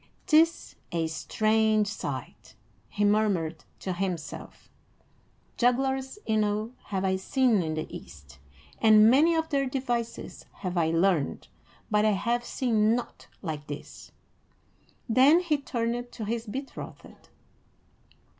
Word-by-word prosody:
"'Tis 325 +2 +3
a 165 -1 0
strange 215 +6 +1
sight," 210 - -6 0.3
he 205 0 0
murmured 195 -7 +1
to 185 - -4
himself. 180 -3 -5 0.9
"Jugglers 265 +4 +1
enow 215 0 0
have 195 -1 -2
I 190 0 +1
seen 235 +1 +2
in 160 -2 -2
the 155 - -3
East, 70 -3 -12 0.4
and 215 0 +7
many 315 +6 +5
of 320 0 -1
their 275 -2 +1
devices 245 -3 -4
have 185 -2 -5
I 165 -2 +2
learned, 165 -2 +1 0.4
but 210 0 +3
I 215 -1 +4
have 235 +5 0
seen 225 -3 +1
naught 245 - -6 0.2
like 155 -4 -5
this." 145 0 -9 1.0
Then 265 +8 +6
he 325 -5 0
turned 240 -2 -3
to 220 - -5
his 230 +2 -3
betrothed. 270 +6 -8
220 Hz, 120 wpm, -27 LUFS, 190-250 Hz, 1.0 s, and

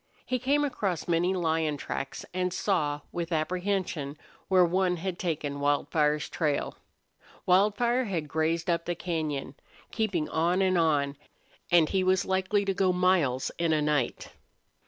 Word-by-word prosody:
He 255 - -1
came 280 +4 +2
across 195 - -2
many 175 +2 +2
lion 160 -3 0
tracks, 135 0 -5
and 180 0 -1
saw, 150 -7 0
with 170 0 -4
apprehension, 175 -3 -2 0.3
where 185 -2 +5
one 180 +1 +1
had 180 +1 -4
taken 150 -5 -2
Wildfire's 150 +1 +1
trail. 150 -4 -1 0.7
Wildfire 210 +7 +3
had 170 -7 -3
grazed 160 +3 -1
up 170 -1 0
the 175 - -2
cañon, 155 -7 -3 0.4
keeping 195 -9 -1
on 170 +3 +1
and 185 -1 +2
on, 145 -4 +1 0.5
and 170 -3 +5
he 190 -1 +1
was 185 +1 +2
likely 190 +2 +1
to 195 - 0
go 190 -1 +2
miles 180 -8 +2
in 165 -1 +2
a 155 - +2
night. 150 -4 -1
175 Hz, 145 wpm, -28 LUFS, 155-190 Hz, 0.7 s, where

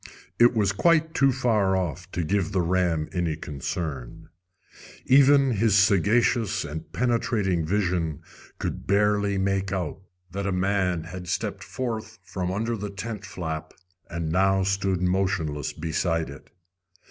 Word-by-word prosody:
It 120 +1 +6
was 105 -3 +2
quite 160 - +2
too 135 0 +4
far 110 -7 +2
off 90 +1 -4
to 85 - -1
give 100 +3 0
the 95 - +2
ram 85 -3 +1
any 85 -4 -1
concern. 70 -3 -5 0.8
Even 140 0 +6
his 110 -2 +2
sagacious 105 +1 +3
and 80 +1 -7
penetrating 115 -8 0
vision 85 -5 -1 0.3
could - - -4
barely 100 0 +2
make 95 0 0
out 90 -5 -3 0.3
that 100 +2 -3
a - - 0
man 90 -2 0
had 90 +2 -8
stepped - - -2
forth 115 -3 -4
from 90 -2 -3
under 115 +4 -1
the 105 -1 -5
tent 105 0 -6
flap 80 -4 -5 0.3
and 85 -2 -3
now 95 +2 +3
stood 95 -1 0
motionless 90 -6 0
beside 80 -1 -1
it. 70 - -13
95 Hz, 135 wpm, -25 LUFS, 85-105 Hz, 0.8 s, It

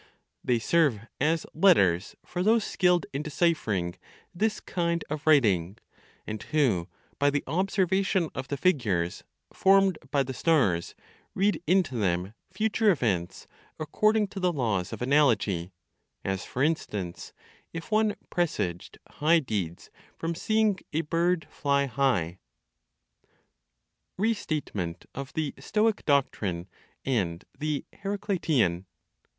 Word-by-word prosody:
They 125 - +2
serve 140 -3 +2 0.2
as 160 +3 +1
letters 100 - +4
for 175 - -4
those 220 +3 +4
skilled 180 -2 +2
in 140 - -2
deciphering 115 - 0 0.4
this 215 +4 0
kind 170 -2 -1
of 150 0 -4
writing; 105 - +3 0.5
and 105 -1 -5
who, 115 - +1 0.3
by 145 0 +4
the 145 0 -1
observation 190 +1 +1
of 130 0 -5
the 140 - -3
figures 110 - 0 0.3
formed 195 -2 +4
by 140 -2 +2
the 130 0 -5
stars, 120 - +1 0.4
read 200 0 +1
into 180 -5 +3
them 95 -3 -1 0.2
future 215 +2 +1
events 105 - 0 0.3
according 215 +6 +2
to 200 - -7
the 180 -1 +2
laws 110 - -1
of - - -5
analogy, 110 - +2 0.5
as 95 -1 -2
for 130 - -2
instance, 105 - -2 0.4
if 165 +6 -7
one 215 -1 +2 0.2
presaged 95 - -2
high 160 +3 +3
deeds 100 - -3 0.3
from 165 +1 -2
seeing 215 +2 +1
a 160 - +1
bird 165 +2 0
fly 140 -1 +1
high. 110 -10 0 1.8
RESTATEMENT 155 - -2
OF 135 0 -6
THE 155 -3 -1
STOIC 215 0 +1
DOCTRINE, 100 - 0 0.4
AND 95 -10 -1
THE 150 -1 -2
HERACLITIAN. 170 - 0
145 Hz, 120 wpm, -27 LUFS, -, 1.8 s, letters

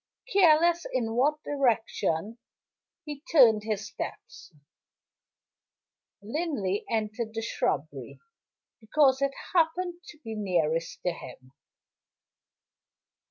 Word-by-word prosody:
Careless 340 -2 +4
in 230 -3 -1
what 295 +6 +1
direction 225 - 0 0.7
he 295 -2 -7
turned 235 -9 +6
his 215 -1 -2
steps, - - -8 1.7
Linley 220 - -2
entered 220 0 -2
the 225 - -2
shrubbery, - - -3 0.6
because 265 +4 +3
it 275 0 +2 0.2
happened 350 +1 +1
to 300 - -12
be 225 -2 -6
nearest 170 -6 -1
to 180 - +1
him. 130 -5 -11
235 Hz, 90 wpm, -28 LUFS, 210-305 Hz, 1.7 s, turned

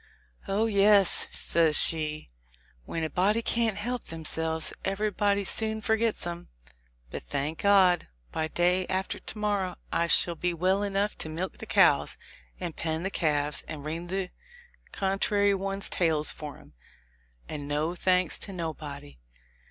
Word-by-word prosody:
"Oh, 205 +3 +1
yes," 200 -2 +4
says 160 -3 +3
she, 155 - +5 0.5
"when 165 - -4
a 160 - -2
body 205 +7 +1
can't 225 -4 +2
help 245 +4 -4
themselves, 160 0 -3
everybody 200 0 0
soon 220 +2 0
forgets 220 -2 0
'em; 170 0 -6 0.6
but, - - -5
thank 150 - -3
God! 190 -3 +4 0.2
by 160 - -2
day 180 +3 +1
after 190 +1 -2
to - - -9
morrow 205 -3 -1 0.2
I 170 - +1
shall 170 +1 +4
be 175 +1 -2
well 185 +4 +1
enough 200 0 -1
to 155 - -3
milk 170 +4 -5
the - - -8
cows, - - +3 0.4
and 175 -3 -5
pen 160 0 -3
the 195 - -2
calves, 150 -4 0
and 150 -2 -7
wring 165 +3 -5
the 185 0 -3 0.6
contrary 200 +1 +1
ones' 195 0 -2
tails 160 -3 +1
for 150 -2 -8
'em, - - -19 0.7
and 145 -2 -6
no 150 +3 -1
thanks 180 -1 +1
to 200 - -6
nobody." 150 - -7
180 Hz, 145 wpm, -27 LUFS, 160-200 Hz, 0.7 s, she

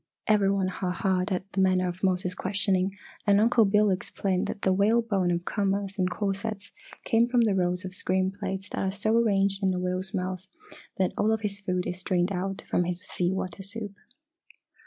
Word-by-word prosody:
Every 205 -2 +3
one 195 -1 +1
ha 185 -1 -3
haed 185 +1 0
at 185 +1 -3
the 195 - +1
manner 185 -1 +3
of 180 +1 -5
Mose's 185 -1 +1
questioning, 190 0 0 0.3
and 200 0 +5
Uncle 230 +1 +4
Bill 210 +1 +3
explained 185 0 -1
that 205 - -6
the 190 - +3
whalebone 200 -2 +2
of 175 0 -1
commerce 200 -1 -1
and 185 0 +2
corsets 200 +2 -3 0.3
came 230 -1 +3
from 245 -1 +3
the 220 -3 +3
rows 180 0 0
of 185 - -6
screen 185 0 +1
plates 195 -1 -5
that - - -4
are 190 - 0
so 215 +3 +1
arranged 200 -3 +2
in 190 -1 +1
a - - -1
whale's 185 +1 -2
mouth 185 -1 -3 0.5
that 185 -1 +1
all 215 +1 +3
of 220 -1 0
his 200 -2 -2
food 180 -2 -2
is 180 - -4
strained 180 0 0
out 195 +2 -3
from 175 - +1
his 175 0 -2
sea 175 -1 -1
water 190 -1 -4
soup. 205 +1 -4
195 Hz, 200 wpm, -27 LUFS, 185-205 Hz, 0.5 s, and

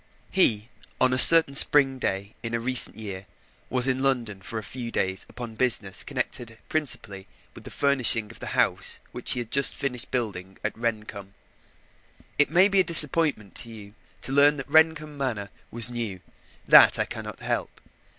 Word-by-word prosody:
He, 115 - 0 0.3
on 130 0 +1
a 130 - 0
certain 165 -1 +7
spring 135 -1 +1
day 100 -2 -5
not 115 0 -7
many 115 0 -4
years 125 - +11 0.2
since, 100 -3 -10 0.4
was 125 0 -1
in 130 0 -2
London 120 -7 -3
for 110 +4 -9
a 110 - -7
few 120 +2 -9
days 95 -4 -4
upon 120 -2 -10
business 110 -5 -1
connected 115 -2 -6
principally 100 -11 -2 0.3
with - - -16
the - - -10
furnishing 125 -6 +2
of - - -16
the - - -9
house - - -1
which - - -2
he - - -5
had 115 - -11
just 140 +1 +5
finished 125 -4 -4
building 95 -6 -6
at 105 - -5
Rendcomb. 105 -4 -7 1.0
It 145 - +3
may 185 +3 +3
be 195 -1 -1
a - - +3
disappointment 155 - +5
to 115 - -6
you 105 -3 -14 0.3
to - - -2
learn 145 +2 +2
that 135 - -8
Rendcomb 160 -2 0
Manor 110 -7 -5 0.2
was 120 +1 0
new; 110 -6 -7 0.4
that - - +5
I - - -2
cannot - - -10
help. - - -6
120 Hz, 175 wpm, -23 LUFS, 105-140 Hz, 1.0 s, years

